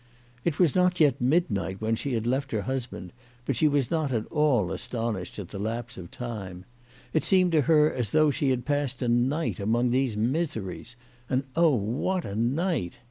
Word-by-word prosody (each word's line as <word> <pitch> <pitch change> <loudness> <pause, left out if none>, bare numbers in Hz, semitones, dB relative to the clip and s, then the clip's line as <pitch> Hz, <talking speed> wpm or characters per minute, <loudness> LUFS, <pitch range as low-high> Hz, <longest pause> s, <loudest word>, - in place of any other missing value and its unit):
It 160 -3 0
was 175 -7 +4
not 180 -1 +2
yet 145 -6 +3
midnight 105 - +1
when 110 +1 0
she 125 0 -2
left 130 +5 -1
her 105 -2 0
husband, 125 -8 -5 0.3
but 135 - -1
she 155 - +3
was 140 -4 +1
not 155 -4 0
at 115 -3 -1
all 140 - +2
astonished 115 -7 -3
at 100 -5 -6
the 100 - -7
lapse 115 +4 -4
of 85 -2 -9
time. 100 -7 -7 0.5
It 155 - +2
seemed 185 -2 +3
to 160 -2 +4
her 150 -1 +5
as 120 -5 -2
though 155 +2 +4
she 140 0 0
had 125 -2 0
passed 140 -3 -1
a - - 0
night 125 +7 +1
among 120 +4 +1
these 130 -4 +1
miseries. 120 - -2 0.3
And, 130 +1 +1
oh, 165 -4 +4
what 125 - -1
a 100 - -5
night 125 - -1
125 Hz, 190 wpm, -27 LUFS, 110-150 Hz, 0.5 s, her